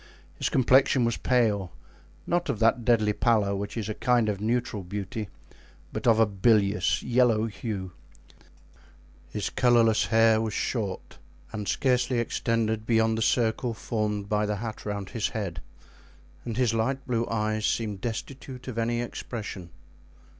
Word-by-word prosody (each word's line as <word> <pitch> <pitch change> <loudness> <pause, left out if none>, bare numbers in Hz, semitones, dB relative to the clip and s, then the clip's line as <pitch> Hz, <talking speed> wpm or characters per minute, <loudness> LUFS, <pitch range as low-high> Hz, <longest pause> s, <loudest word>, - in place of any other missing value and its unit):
His - - -2
complexion 130 0 +4
was 115 - 0
pale, 105 -7 +1 0.5
not 175 -2 0
of 130 - 0
that 115 +3 +2
deadly 110 -3 +3
pallor 105 -4 +2
which 100 +3 -5
is 110 -3 -3
a 110 - -2
kind 120 -1 +2
of 100 -1 -3
neutral 115 -1 -1
beauty, 100 +2 -5 0.6
but - - -3
of 115 -1 +5
a 115 - +6
bilious, 105 0 +2
yellow 120 -3 +3
hue; 105 -4 -5 1.4
his 105 - -3
colorless 115 -3 +3
hair 115 -1 +4
was 110 -2 -3
short 105 -7 -3 0.3
and 105 -2 -4
scarcely 125 -1 +1
extended 115 -2 -1
beyond 110 -1 +3
the 110 - -2
circle 115 +1 +1
formed 105 -2 -2
by 105 0 0
the 105 - -1
hat 110 0 -6
around 100 -2 -4
his 115 -2 -1
head, 95 -9 -4 0.8
and 115 -2 -4
his 125 -3 +2
light 130 +4 -1
blue 115 -2 -1
eyes 110 -1 0
seemed 105 -4 -2
destitute 130 +2 -6
of 120 -3 -4
any 120 +1 0
expression. 105 -6 -6
110 Hz, 145 wpm, -27 LUFS, 105-120 Hz, 1.4 s, a